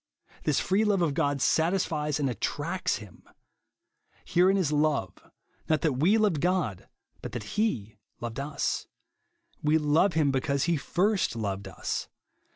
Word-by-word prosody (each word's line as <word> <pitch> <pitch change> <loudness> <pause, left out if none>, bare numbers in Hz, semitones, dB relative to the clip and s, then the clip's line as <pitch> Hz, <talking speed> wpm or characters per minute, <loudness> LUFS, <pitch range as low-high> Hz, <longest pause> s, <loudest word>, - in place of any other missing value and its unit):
This 150 - +2
free 195 +3 +2
love 200 -4 +2
of 155 -4 +1
God 145 -1 0
satisfies 160 -3 +1
and 140 - +1
attracts 170 - -1
him. 105 -4 -11 0.5
" - - -38
Herein 185 +3 +3
is 175 -6 +1
love, 150 - +1 0.6
not 155 -3 +2
that 155 -4 +2
we 180 +9 +4
loA^ed 205 -8 +2
God, 175 - 0 0.3
but - - -7
that 120 -3 -4
he 110 - -1 0.2
loved 120 +1 -5
us." 140 +1 -2 0.4
" 345 0 -42
We 150 +1 +4
love 160 +5 +3
him 150 -3 +2
be 135 -1 0
cause 140 -2 0
he 170 -1 +2
first 190 - 0
loved 100 -3 -3
us." - - -4
155 Hz, 160 wpm, -28 LUFS, 135-185 Hz, 0.6 s, we